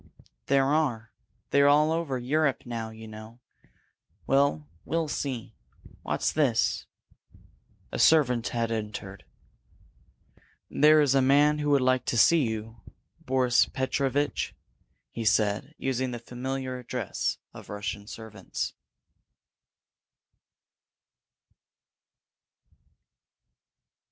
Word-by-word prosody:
"There 135 -1 +3
are. 135 -6 0 0.4
They're 140 0 +5
all 150 +2 +4
over 160 -5 -1
Europe 140 +2 0
now, 115 -2 -4
you 110 0 -11
know. 110 +2 -11 0.9
Well, 135 - +2 0.2
we'll 165 -1 -1
see. 130 -6 -4 0.5
What's - - -1
this?" 135 -7 +1 1.0
A - - -4
servant 125 -7 +4
had 115 -1 -2
entered. 105 -3 -5 1.5
"There 155 +1 +5
is 140 -3 +3
a 135 - +4
man 145 +3 +4
who 150 0 -1
would 130 -2 +2
see 155 +8 +5
you, 110 +1 -6 0.4
Boris 125 -2 +2
Petrovitch," 135 +2 -1 0.6
he 115 - -5
said, 110 +6 +1
using 130 -1 -1
the 120 - -5
familiar 130 +2 -5
address 125 -3 -3 0.2
of - - -12
Russian 105 0 -5
servants. 110 -4 -6
130 Hz, 90 wpm, -27 LUFS, 110-140 Hz, 1.5 s, They're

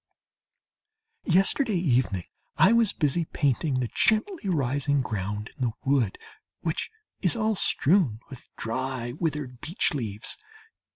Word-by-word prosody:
...Yesterday 195 - +3
evening 125 - +1 0.3
I 190 - +6
was 230 -3 +4
busy 160 +2 0
painting 140 -1 0
the 125 -2 -1
gently 215 - +1
rising 145 -2 +1
ground 105 -2 -4
in - - -13
the 115 - -1
wood, 130 -7 +2 0.4
which - - -2 0.3
is - - +3
all 220 -1 +1
strewn 160 - +3
with 130 -3 -12
dry 125 +1 -3
withered 145 -4 -3
beech 165 +4 0
leaves. 110 - -3
140 Hz, 120 wpm, -27 LUFS, 120-180 Hz, 0.4 s, I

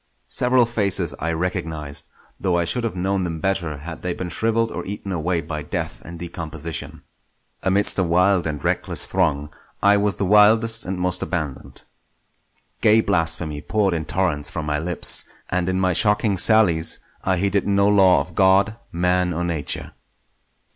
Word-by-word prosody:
Several 125 0 +2
faces 100 -8 -1
I 85 +2 -1
recognised; 80 -4 -4 0.3
though 90 -2 +1
I 85 - +1
should 120 +8 0
have 115 -5 -2
known 95 +1 -1
them 85 -2 -4
better 85 -4 -1
had 80 +3 -8
they 90 -1 -3
been 90 - -5
shrivelled 115 +3 0
or - - -5
eaten 100 0 -6
away 85 0 -1
by 75 -1 -5
death - - -5
and 85 0 -9
decomposition. 80 -2 -6 0.6
Amidst 100 +1 +2
a - - +3
wild 90 +1 +2
and 75 -3 -4
reckless - - 0
throng 75 +1 -1 0.3
I 100 0 +5
was 100 -2 +1
the 100 - -1
wildest 110 +2 +4
and 95 0 -3
most 90 0 -1
abandoned. 75 -7 -4 1.0
Gay 110 +1 +5
blasphemy 80 -6 -1
poured 100 -1 0
in 80 -2 -2
torrents 80 -6 -1
from 80 - -5
my 75 0 -1
lips, 85 +2 +1 0.3
and 90 0 0
in 95 0 0
my 95 -1 +2
shocking 105 +2 +2
sallies 90 -5 +4 0.3
I 95 -1 +1
heeded 100 +2 0
no 100 0 +3
law 95 -3 +5
of - - -8
God, 100 +2 +3
Man, 90 +1 +1
or 85 +2 -2
Nature. 80 -5 -2
90 Hz, 165 wpm, -22 LUFS, 80-100 Hz, 1.0 s, I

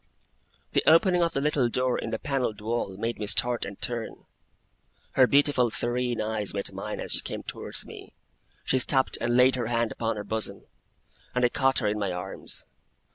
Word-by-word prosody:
The - - +2
opening 175 +2 +5
of 170 -1 +1
the 135 - -1
little 140 -4 +1
door 125 +1 0
in - - -4
the - - -2
panelled 130 -7 -2
wall 105 -3 -3
made 115 +3 -3
me 105 - -3
start 120 +3 +3
and 100 - -9
turn. 120 -2 -2 0.9
Her 130 -1 +5
beautiful 140 -3 +4
serene 120 +1 +1
eyes 110 -2 -2
met 100 - -1
mine - - -5
as - - -4
she - - 0
came - - -6
towards - - -3
me. - - -12 0.5
She 130 - +1
stopped 130 +1 +2
and 120 +1 +1
laid 130 +1 +6
her 120 -3 -2
hand 115 -1 0
upon 115 -1 -2
her 105 - -5
bosom, 105 -1 -1 0.7
and 125 0 +3
I - - +3
caught 135 +1 +1
her 110 - +1
in 105 +1 -1
my 100 -3 -1
arms. 90 0 -5
120 Hz, 190 wpm, -27 LUFS, 110-130 Hz, 0.9 s, laid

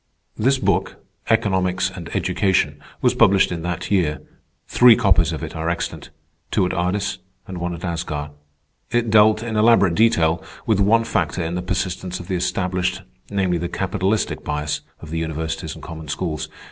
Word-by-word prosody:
This 130 +5 +2
book, 130 - 0 0.3
"Economics 95 -4 +1
and 90 -3 -8
Education," 80 -7 +1 0.2
was - - +4
published 95 -1 +4
in 85 -2 -3
that 90 +2 -4
year. 85 -7 +1 0.5
Three 120 -2 +7
copies 85 -6 +3
of 80 0 -5
it 80 - -6
are 80 +1 -2
extant; 85 - -4 0.4
two - - +2
at 90 - -1
Ardis, 90 +3 -1 0.3
and 95 -2 -6
one 85 0 -3
at 85 - -11
Asgard. 80 -4 -3 0.6
It 120 -2 0
dealt, 110 +1 +5
in 115 -2 -3
elaborate 105 -5 +5
detail, 85 -6 +3 0.2
with 110 -3 +2
one 110 +3 +4
factor 85 -5 -1
in 80 - -3
the 90 - -2
persistence 90 0 -3
of 90 +1 -10
the 95 - 0
established, 90 +1 -1 0.3
namely, 95 -4 0
the 85 +1 -3
capitalistic 95 +2 -1
bias 75 0 -2 0.2
of 80 - -10
the 80 - -2
universities 80 0 -4
and - - -12
common 80 -2 -8
schools. 80 +1 -3
90 Hz, 170 wpm, -21 LUFS, 80-100 Hz, 0.6 s, Three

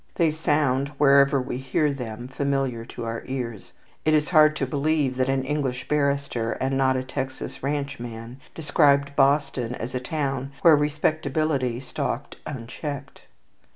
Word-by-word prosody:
They 165 -3 +3
sound, 145 -3 +1
wherever 140 -1 +5
we 125 -1 -3
hear 135 +3 0
them, 120 -2 -6
familiar 135 -3 -1
to 115 - -7
our 115 0 -3
ears. 120 -6 -5 0.3
It 155 0 +3
is 150 0 +1
hard 155 -2 +6
to 140 - -1
believe 140 0 0
that 130 0 +1
an 135 -1 +1
English 135 -3 -2
barrister, 140 -5 0
and 135 +1 -1
not 130 -1 +3
a 130 - -2
Texas 130 0 -5
ranch 140 -1 -2
man, 120 +1 -8 0.2
described 140 -2 +3
Boston 135 -4 +2
as 115 +2 -6
a 125 - -1
town 135 0 -3
where 165 -2 +8
respectability 150 -3 0
stalked 135 - -4
unchecked. 140 +1 -7
135 Hz, 150 wpm, -25 LUFS, 130-150 Hz, 0.3 s, where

